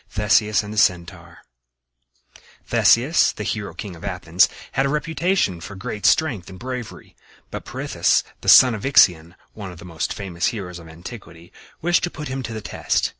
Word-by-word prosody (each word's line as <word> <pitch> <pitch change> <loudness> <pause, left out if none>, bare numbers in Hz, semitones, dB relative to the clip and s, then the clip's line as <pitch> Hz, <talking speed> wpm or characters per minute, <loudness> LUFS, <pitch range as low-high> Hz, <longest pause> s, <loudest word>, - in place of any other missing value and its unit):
THESEUS 105 0 +2
AND 105 +1 -7
THE 105 - 0
CENTAUR 85 -3 -1 1.3
Theseus, 130 +8 +3
the 105 - -6
hero 105 -1 -4
king 100 -5 -7
of 80 - -14
Athens, - - +2 0.2
had 135 +1 +1
a - - -2
reputation 155 - 0
for 100 +4 -9
great 95 +1 -2
strength 115 - +1
and 95 - -11
bravery; 125 0 -8 0.4
but - - -7
Pirithous, - - 0 0.2
the - - -1
son 130 -2 +8
of 105 - -6
Ixion, 90 - +4 0.2
one 100 -4 -8
of 90 - -12
the 85 - -12
most 85 -1 -4
famous 90 -4 -3
heroes 95 -7 -5
of 80 -1 -13
antiquity, 85 0 -12 0.3
wished 175 +1 +2
to - - -4
put 150 -4 -8
him 135 +1 -4
to 115 - -6
the 110 -1 -5
test. - - -1
105 Hz, 175 wpm, -21 LUFS, 90-130 Hz, 1.3 s, son